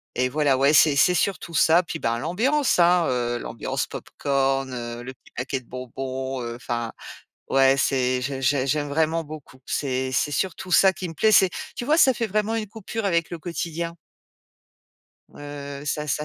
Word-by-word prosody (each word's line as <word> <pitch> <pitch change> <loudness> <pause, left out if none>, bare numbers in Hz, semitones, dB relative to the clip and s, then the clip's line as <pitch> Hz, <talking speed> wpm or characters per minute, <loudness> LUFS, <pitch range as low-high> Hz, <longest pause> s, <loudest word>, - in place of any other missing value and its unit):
et 125 +1 +1
voilà. 145 -2 +2
Ouais, 140 +2 +4
c'est 150 -1 +6
c'est 180 +6 +4
surtout 175 -1 -1
ça. 165 +3 +4
Puis 165 -1 -6
ben, 115 +1 -1
l'ambiance, 240 - +1
hein, 175 0 +5
heu, 120 -1 -1
l'ambiance 115 - -3
pop-corn, 135 -1 -1
heu, 120 0 -6
le 130 - -7
petit - - -24
paquet 130 +2 -3
de 120 - -22
bonbons, 130 +1 -5
heu 120 0 -5
enfin, 120 -2 -4 0.6
ouais, 135 0 +4
c'est 130 -2 +1
j'ai 135 0 -3
j'ai 135 0 +2
j'aime 145 +1 0
vraiment 160 +2 +1
beaucoup. 150 -3 -11
C'est 130 -2 -2
c'est 145 +3 0
surtout 185 +3 -3
ça 190 +2 +6
qui 180 0 -5
me - - -8
plaît, 215 +6 +3
c'est 190 -2 +6 0.3
tu - - -4
vois, 305 +3 +3
ça 265 -6 +6
fait 230 0 -2
vraiment 215 +2 0
une 215 -2 -3
coupure 220 +1 -5
avec 170 -2 0
le 170 - -5
quotidien. 170 0 -4 1.4
Heu, 145 -1 -8
ça 150 +1 -2
ça 150 +1 -1
145 Hz, 185 wpm, -24 LUFS, 130-175 Hz, 1.4 s, c'est